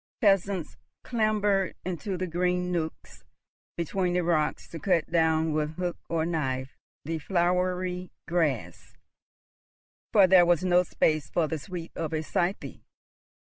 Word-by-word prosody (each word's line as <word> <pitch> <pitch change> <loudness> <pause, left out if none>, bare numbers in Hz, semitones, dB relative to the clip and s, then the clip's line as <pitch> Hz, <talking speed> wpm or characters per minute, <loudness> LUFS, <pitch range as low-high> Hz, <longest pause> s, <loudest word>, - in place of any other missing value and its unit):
Peasants 195 - +1 0.3
clambered 210 -4 +1
into 185 +2 -3
the 185 - -2
green 180 +1 0
nooks 160 -2 -4 0.5
between 180 +2 -1
the 180 0 +1
rocks 160 -3 0
to 165 - -7
cut 170 -2 +1
down 160 -1 +2
with 155 0 -1
hook 180 0 -2
or 165 -1 0
knife 135 -6 -2 0.3
the 165 +1 -2
flowery 180 +1 0 0.2
grass, 160 -8 -2 1.1
for 200 -3 +7
there 180 -1 +6
was 175 -1 +3
no 180 -1 +4
space 155 -4 0
for 165 -3 +1
the 160 0 -3
sweep 175 0 -7
of 165 -1 -3
a 155 0 -1
scythe. 175 +5 -2
175 Hz, 135 wpm, -27 LUFS, 160-185 Hz, 1.1 s, for